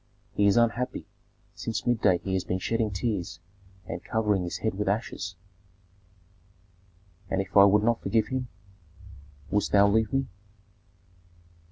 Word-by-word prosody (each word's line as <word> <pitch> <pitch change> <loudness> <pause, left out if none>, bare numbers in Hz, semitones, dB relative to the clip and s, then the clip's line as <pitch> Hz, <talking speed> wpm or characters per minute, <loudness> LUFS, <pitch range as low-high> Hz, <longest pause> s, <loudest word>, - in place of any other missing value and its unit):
He 100 - +3
is 100 - +4
unhappy; 120 +1 0 0.5
since 115 -1 -4
midday 105 -7 +3
he 95 +2 -5
has 95 - 0
been 90 - -2
shedding 115 +3 -1
tears 95 -5 -3 0.5
and 85 -1 -6
covering 105 -3 0
his 90 -1 -4
head 110 - -1
with 105 +1 -3
ashes." 100 -2 -3 1.9
"And 95 - 0
if 95 -1 -4
I 100 0 +9
would 105 +1 +4
not 115 0 +1
forgive 110 -2 +1
him, 130 -1 -2 1.0
wouldst 105 +1 0
thou 100 0 +6
leave 110 +2 +2
me?" 135 0 +1
105 Hz, 140 wpm, -27 LUFS, 95-115 Hz, 1.9 s, I